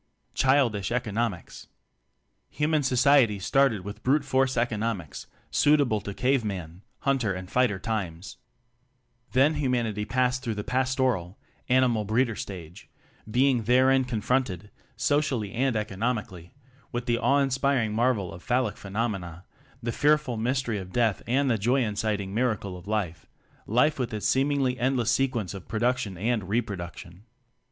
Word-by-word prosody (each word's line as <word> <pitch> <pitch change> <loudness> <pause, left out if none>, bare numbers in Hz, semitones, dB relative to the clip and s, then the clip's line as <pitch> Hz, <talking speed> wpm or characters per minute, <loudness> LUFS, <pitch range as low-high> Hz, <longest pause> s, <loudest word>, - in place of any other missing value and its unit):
Childish 125 -7 +2
Economics. 115 -5 -3 0.8
Human 150 0 +1
society 130 -4 +4
started 120 +2 +2
with 100 +1 -7
Brute 140 +2 +2
force 130 -1 +1
Economics, 110 -9 -2 0.2
suitable 145 -8 +3
to 100 - -6
Cave 130 0 +1
man 90 -4 -5 0.2
Hunter 130 -8 +1
.and 90 0 -7
Fighter 125 -6 +2
times. 95 -5 -4 1.0
Then 135 +4 +4
humanity 125 -7 -1
advanced 125 +3 0
through 115 -4 -3
the 105 - -4
Pastoral 125 -7 0 0.3
animal 125 -4 +3
breeder 115 +2 +1
stage, 90 -5 -8 0.4
be 125 +5 +3
ing 125 -5 +1
therein 130 +3 +4
confronted, 110 -4 -1 0.2
socially 125 -5 0
and 130 +1 0
economically, 105 -4 -3 0.4
with 120 0 -3
the 120 -2 +1
awe 135 +5 +3
inspiring 135 -4 +1
marvel 110 -6 +1
of 85 - -10
phallic 125 -1 0
phenomena, 95 -4 -4 0.4
the 115 - -1
fear 150 +6 +4
ful 135 -5 -5
mystery 120 -1 -1
of 95 -1 -9
Death 115 -3 +1
and 135 +4 +2
the 115 -4 +1
joy 125 +6 +2
inciting 105 -2 -2
miracle 110 -5 -1
of 90 +2 -12
Life 90 -7 -2 0.4
life 130 +7 +2
with 125 -3 -2
its 105 - -1
seemingly 135 -1 +1
endless 125 -2 +1
sequence 120 -9 0
of 95 -2 -9
pro 110 - -3
duction 120 -7 0
and 110 -3 -1
reproduction. 95 -4 -4
115 Hz, 140 wpm, -26 LUFS, 100-130 Hz, 1.0 s, society